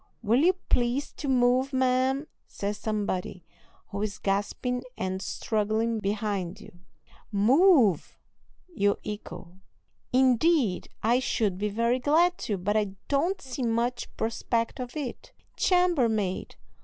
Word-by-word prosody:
"Will 230 +4 +3
you 350 +5 +5
please 245 +4 +1
to 290 - -6
move, 255 +1 +2
ma'am?" 260 +2 +1 0.2
says 205 +1 -4
somebody, 200 -5 -3 0.4
who 200 - -4
is 210 -2 -3
gasping 205 +5 -1 0.2
and 190 0 -3
struggling 220 +3 -1
behind 200 -3 -2
you. 175 - -15 0.5
"Move!" 240 - +4 0.6
you 200 -7 +2
echo. 190 -3 -8 0.5
"Indeed, 255 - +3
I 235 +3 +3
should 210 -7 -1
be 210 +1 0
very 235 +4 +1
glad 330 +7 +3
to, 205 - 0
but 200 +4 -1
I 205 -3 0
don't 330 +8 +1
see 260 0 -6
much 235 +1 0
prospect 230 +2 -1
of 250 +3 -6
it." 275 -5 -6 0.2
"Chambermaid!" 245 - +1
230 Hz, 120 wpm, -27 LUFS, 205-260 Hz, 0.6 s, you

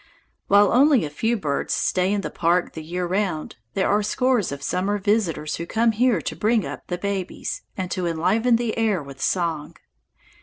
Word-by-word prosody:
While 200 0 +5
only 270 - +5
a 145 - -6
few 225 +10 0
birds 145 -8 -1
stay 185 +1 +1
in 205 -1 0
the - - -5
park 175 +1 +1
the 160 - -6
year 175 +3 -3
round, 180 - -2 0.2
there 190 - +1
are 205 +1 +2
scores 240 - +1
of 140 0 -6
summer 195 +6 0
visitors 200 -7 0
who 170 - -5
come 230 +3 +2
here 225 -4 +2
to - - -4
bring 220 -1 +1
up - - -7
the 175 - -3
babies, 195 0 -3 0.2
and 185 -2 -3
to 180 -2 -1
enliven 220 +9 +2
the 230 -1 -1
air 210 -8 +1
with 140 -1 -11
song. 165 -5 -1
195 Hz, 190 wpm, -23 LUFS, 170-220 Hz, 0.2 s, While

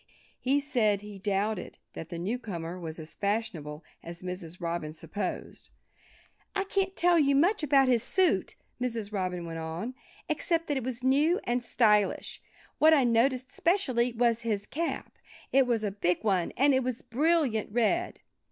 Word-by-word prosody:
He 275 +3 +2
said 230 -8 +1
he 205 -1 -10
doubted 200 0 -2 0.2
that 165 - -8
the 170 - -5
newcomer 180 -3 -4
was 160 -2 -6
as 160 -1 -4
fashionable 190 -8 -3 0.2
as 170 +1 -9
Mrs. 180 -2 -6
Robin 170 -3 -3
supposed. 205 +5 -5 0.9
"I 390 - +1
can't 390 -1 -1
tell 345 -1 +4
you 280 -2 +3
much 355 +9 +3
about 275 -3 +4
his 245 -3 +3
suit," 370 - +1 0.3
Mrs. 225 -4 -2
Robin 180 -3 -2
went 165 -1 -5
on, 165 +10 -4 0.3
"except 330 -2 0
that 290 - +1
it 265 - -2
was 250 0 -3
new 295 +7 +3
and 245 +1 0
stylish. 210 -4 +2 0.4
What 315 +1 +7
I 280 - +4
noticed 250 +2 +2
specially 260 -9 +1
was 235 -1 +2
his 210 -3 -2
cap. 330 +7 -4 0.3
It 270 -1 +4
was 230 -3 +1
a 205 - -1
big 180 -2 0
one 190 -5 +1
and 280 +3 +4
it 260 - +3
was 250 -1 -3
a - - -31
brilliant 255 -4 +1
red." 245 +11 0
230 Hz, 165 wpm, -29 LUFS, 190-275 Hz, 0.9 s, What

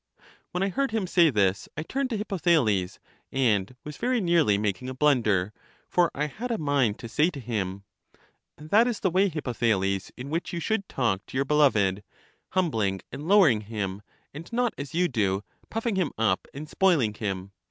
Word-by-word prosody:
When 180 +2 -2
I 195 - +1
heard 275 +7 0
him 220 -3 -1
say 175 -2 +4
this, 100 -6 +1
I 155 - -2
turned 270 +9 -2
to 230 - -2
Hippotha 180 -5 +2
les, 100 -8 0 0.3
and 115 -4 +1
was 150 0 -8
very 250 +1 +1
nearly 170 - +3
making 105 +4 -2
a 130 - -6
blunder, 110 -9 +2 0.3
for 175 -1 +3
I 150 - 0
had 220 - -5
a 230 - 0
mind 140 -8 +1
to 115 - -8
say 150 +8 +2
to 155 -6 -8
him: 100 -6 -3 0.7
That 200 +11 +3
is 240 -4 -2
the 190 - +1
way, 195 +3 +3
Hippothales, 110 - -1
in 130 +3 -7
which 165 +3 -2
you 170 - -2
should 200 +3 -1
tajk 115 -7 0
to - - -5
your 140 - +1
beloved, 105 -10 +3 0.5
humbling 110 - 0
and 145 +3 -7
lowering 175 - +5
him, 100 -2 -4 0.3
and 160 +7 -9
not 240 0 +1
as 145 +3 -7
you 180 +1 +3
do, 105 - 0 0.3
puffing 225 -2 -2
him 180 -6 0
up 110 -4 +1
and 150 +3 -8
spoiling 155 - +2
him. 100 -3 -4
140 Hz, 185 wpm, -26 LUFS, -, 0.7 s, lowering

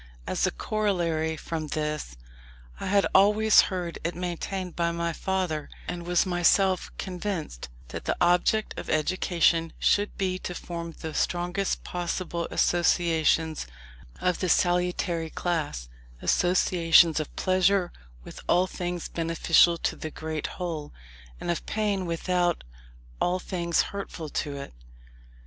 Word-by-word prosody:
As - - +1
a - - 0
corollary 165 - -1
from 160 0 -4
this, 150 - -3 0.6
I - - -4
had 200 0 +3
always 210 +2 +6
heard 180 -3 -4
it 170 +2 -2
maintained 180 +1 -4
by 170 -1 +1
my 170 0 -2
father, 180 -5 -2 0.2
and 175 -1 -5
was 175 +1 +3
myself 185 +1 +2
convinced, 180 - -4 0.2
that - - -6
the - - 0
object 180 +5 +2
of - - -7
education 165 0 +2
should 205 0 +1
be 185 -1 -1
to 180 - -5
form 170 -1 -6
the 160 -1 -5
strongest 180 +4 -1
possible 175 -1 -3
associations 165 - +2 0.5
of 180 -1 0
the 185 - -1
salutary 175 -1 +1
class; 155 - -2 0.3
associations 170 - +4
of 155 - -5
pleasure 185 0 +2 0.3
with - - -10
all 180 +1 +4
things 175 -2 -4
beneficial 165 +1 +3
to - - -1
the 155 - -6
great 155 -1 -4
whole, 160 -5 -4 0.5
and 175 - -2
of 170 - -3
pain 205 -4 -1
with 165 +1 -4
all 60 - -2
things 170 -2 0
hurtful 180 -5 -6
to 145 0 -3
it. 140 - -8
175 Hz, 130 wpm, -27 LUFS, 160-185 Hz, 0.6 s, always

